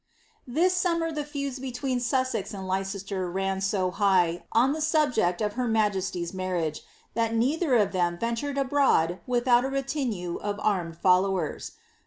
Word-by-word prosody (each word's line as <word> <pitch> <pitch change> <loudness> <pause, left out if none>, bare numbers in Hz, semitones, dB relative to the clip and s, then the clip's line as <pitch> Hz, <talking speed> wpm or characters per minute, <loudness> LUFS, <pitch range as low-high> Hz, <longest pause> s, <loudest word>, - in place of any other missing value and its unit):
This 335 +9 +2
summer 335 -2 0
the 300 -1 -3
feuds 280 -2 -4
between 255 0 -2
Sussex 250 -4 -1
and 190 -1 -6
Leicester 195 0 -2
ran 195 +1 -2
so 190 -2 0
high, 185 -4 +2
on 250 +5 +3
the 315 - -4
subject 270 - +2
of 210 -1 -1
her 250 +1 -1
majesty's 195 -6 0
marriage, 180 -5 -2 0.3
that 230 0 0
neither 270 +5 +2
of 210 -4 +3
them 175 -2 0
ventured 235 +7 -2
ibroad 265 - +2
without 245 0 +3
a 265 - -1
retinue 265 - -2
of 205 0 -4
armed 175 -6 0
followers. 185 -2 +1
220 Hz, 150 wpm, -27 LUFS, 185-265 Hz, 0.3 s, on